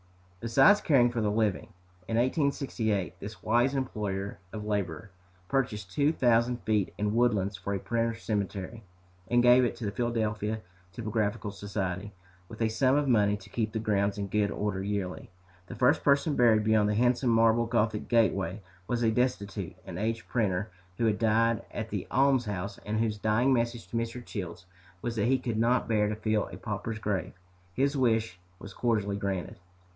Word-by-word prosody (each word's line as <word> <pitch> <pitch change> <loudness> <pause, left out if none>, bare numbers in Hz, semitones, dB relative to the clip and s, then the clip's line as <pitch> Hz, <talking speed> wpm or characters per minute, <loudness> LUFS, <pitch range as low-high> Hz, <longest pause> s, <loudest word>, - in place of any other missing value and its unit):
Besides 120 - +5
caring 125 -6 +4
for 120 -2 -2
the 105 - +1
living, 110 0 0 0.4
in 115 - -1
1868 120 - 0
this 100 -1 -9
wise 120 +5 +2
employer 100 -7 -3
of 105 -1 -6
labor 100 -2 -3 0.4
purchased 105 -8 -1
two 145 +9 +2
thousand 120 -3 +2
feet 105 -4 +1
in 105 0 0
Woodlands 105 -5 +2
for 95 +3 -3
a - - -2
printers' 115 0 -2
cemetery, 100 +1 -3 0.4
and 120 +2 +3
gave 125 +1 +7
it 120 - 0
to 115 - -6
the 100 - -1
Philadelphia 110 -1 -1 0.3
Typographical 105 0 -2
Society, 100 -1 -4 0.4
with 110 - -10
a 110 - +2
sum 130 +4 +2
of 145 -1 +1
money 105 -4 +3
to 105 0 -16
keep 110 -2 -1
the - - -1
grounds 100 -2 0
in 100 - -2
good 100 +1 0
order 105 -2 -2
yearly. 100 -2 -3 0.4
The - - -8
first 125 +3 +3
person 140 +1 +3
buried 110 -3 +4
beyond 110 -1 +3
the 105 - 0
handsome 125 +2 +2
marble 115 0 +4
gothic 110 -2 0
gateway 100 -4 +1 0.2
was 120 -1 -1
a 110 - +3
destitute 115 -5 -1
and 85 - -6
aged 115 +1 -2
printer 105 -3 -1 0.3
who 115 - +1
had 105 -1 +1
died 115 0 +2
at - - -5
the - - -3
almshouse 115 -8 +1
and 110 +1 -3
whose 110 -2 -1
dying 115 +6 +2
message 120 -1 -1
to - - -7
Mr. 115 +1 -3
Childs 90 -3 -6 0.4
was 120 -1 -2
that 105 - +1
he 130 +1 +3
could 120 -3 -3
not 120 +2 +2
bear 105 -2 +2
to 105 - -2
fill 110 -1 0
a - - -9
pauper's 110 +1 -4
grave. 105 -3 -2 0.4
His 140 +2 +1
wish 115 -7 +1 0.2
was 100 +2 -10
cordially 105 -4 0
granted. 95 -3 -3
110 Hz, 175 wpm, -29 LUFS, 100-120 Hz, 0.4 s, gave